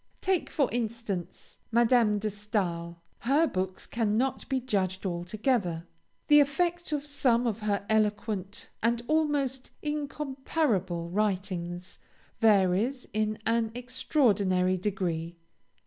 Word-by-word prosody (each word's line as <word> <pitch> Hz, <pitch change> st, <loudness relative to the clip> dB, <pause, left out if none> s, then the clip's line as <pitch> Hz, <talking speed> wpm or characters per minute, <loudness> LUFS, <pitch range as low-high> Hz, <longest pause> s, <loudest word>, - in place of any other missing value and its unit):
Take 375 Hz, -2 st, 0 dB
for 280 Hz, -4 st, +2 dB
instance, 220 Hz, -6 st, -4 dB
Madame 235 Hz, -2 st, +4 dB
de 210 Hz, +1 st, -2 dB
Stael; 180 Hz, -5 st, -2 dB, 0.2 s
her 285 Hz, +7 st, +3 dB
books 185 Hz, -, -3 dB
cannot 230 Hz, +3 st, 0 dB
be 265 Hz, -1 st, +1 dB
judged 195 Hz, -6 st, -1 dB
altogether; 180 Hz, 0 st, -1 dB, 0.4 s
the 295 Hz, -1 st, +8 dB
effect 345 Hz, +4 st, +1 dB
of 295 Hz, -1 st, -1 dB
some 250 Hz, -5 st, +2 dB
of 225 Hz, -2 st, -1 dB
her 205 Hz, -2 st, -1 dB
eloquent 210 Hz, -2 st, -1 dB
and 235 Hz, +1 st, +1 dB
almost 290 Hz, -4 st, 0 dB
incomparable 270 Hz, -, -1 dB
writings 185 Hz, -3 st, -2 dB, 0.4 s
varies 215 Hz, +4 st, +3 dB
in 215 Hz, 0 st, 0 dB
an 225 Hz, -1 st, +1 dB
extraordinary 210 Hz, -8 st, +2 dB
degree. 175 Hz, -4 st, -2 dB
215 Hz, 105 wpm, -29 LUFS, 190-260 Hz, 0.4 s, the